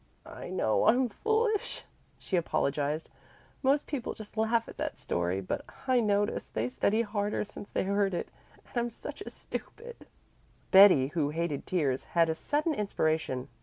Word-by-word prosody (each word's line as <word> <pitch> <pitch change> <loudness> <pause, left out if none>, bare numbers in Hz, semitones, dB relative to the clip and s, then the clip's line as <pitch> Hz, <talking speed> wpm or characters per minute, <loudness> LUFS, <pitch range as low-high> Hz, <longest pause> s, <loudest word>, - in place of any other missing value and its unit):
"I - - -8
know 145 -12 +1
I'm 250 +2 +4
foolish," 440 - 0 0.3
she 190 - -3
apologized. 150 -2 0 0.5
"Most 280 +2 +3
people 275 -6 -4
just 215 -1 -10
laugh 225 +1 +1
at - - -11
that - - -3
story, 90 +2 -1
but 95 - -3 0.2
I 255 -2 +4
notice 205 -2 +1
they 110 +3 -2
study 210 - +1
harder 205 -1 -1
since 205 0 -10
they - - 0
heard 200 -1 +1
it. - - -4 0.4
And - - -20
I'm 240 0 +1
such 230 - -8
a - - -6
stupid." 475 0 -8 0.6
Betty, 190 -9 +8
who 150 -2 0
hated 160 -2 -2
tears, 140 -8 0
had 165 -1 +5
a - - 0
sudden 300 - 0
inspiration. 160 - -1
200 Hz, 160 wpm, -30 LUFS, 150-235 Hz, 0.6 s, Betty